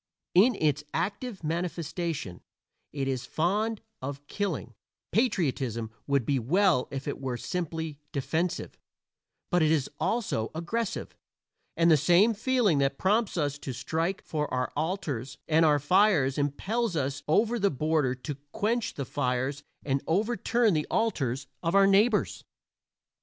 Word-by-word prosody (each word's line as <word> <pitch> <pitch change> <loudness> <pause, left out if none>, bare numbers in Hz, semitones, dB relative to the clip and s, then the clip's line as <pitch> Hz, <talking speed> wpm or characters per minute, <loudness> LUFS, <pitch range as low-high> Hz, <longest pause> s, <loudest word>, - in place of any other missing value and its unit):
In 215 +7 +6
its 150 -4 +1
active 205 0 -3
manifestation 165 - -3 0.5
it 140 -2 -2
is 130 -2 -2
fond 210 +7 0 0.2
of 140 +2 -6
killing 175 - -3 0.4
patriotism 135 - 0 0.2
would 140 -4 +2
be 140 -2 +1
well 170 - +3
if 135 0 -5
it 145 - -4
were 130 -2 -2
simply 160 -2 -4
defensive; 165 +5 -2 0.7
but 175 -1 +3
it 155 - +4
is 155 -4 +1
also 205 - 0
aggressive, 200 +7 -3 0.6
and 170 0 +5
the 155 - +7
same 180 - +5
feeling 220 - +2
that 135 0 +1
prompts 210 +1 +1
us 145 -2 -1
to 135 - -5
strike 160 +9 -2
for 150 -2 -3
our 125 0 -1
altars 150 - -3
and 160 +1 +4
our 150 -2 +5
fires 150 -3 +3
impels 190 - -1
us 140 -1 -1
over 220 +9 +2
the 200 -1 +3
border 150 -3 +1
to 135 +2 -6 0.2
quench 230 +2 0
the 140 - -3
fires 130 +3 -1 0.2
and 135 -1 0
overturn 220 +4 +2
the 155 -2 0
altars 135 - 0 0.2
of 165 +2 0
our 200 0 +7
neighbors. 210 +3 +3
160 Hz, 140 wpm, -28 LUFS, 140-200 Hz, 0.7 s, the